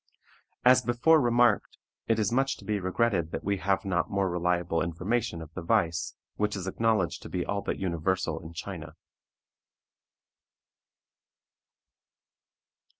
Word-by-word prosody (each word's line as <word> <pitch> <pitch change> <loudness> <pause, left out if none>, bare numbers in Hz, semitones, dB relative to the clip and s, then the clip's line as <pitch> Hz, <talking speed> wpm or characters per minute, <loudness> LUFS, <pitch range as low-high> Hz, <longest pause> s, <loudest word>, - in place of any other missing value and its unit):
As 125 0 +7
before 125 +7 +4
remarked, 120 -3 +2 0.3
it 115 - +2
is 105 -2 +1
much 135 +2 +1
to - - -14
be 105 -1 0
regretted 95 -2 0
that - - -5
we 100 0 0
have 95 +3 0
not 90 -3 0
more 100 -2 0
reliable 85 -1 0
information 90 +2 -2
of 80 0 -14
the 90 - -5
vice, 85 0 0 0.2
which 105 0 0
is 95 -2 -4
acknowledged 105 -1 0
to - - -9
be 90 - -2
all 100 0 -2
but - - -3
universal 95 +1 -1
in 80 - -10
China. 80 - -7
95 Hz, 135 wpm, -28 LUFS, 85-115 Hz, 0.3 s, As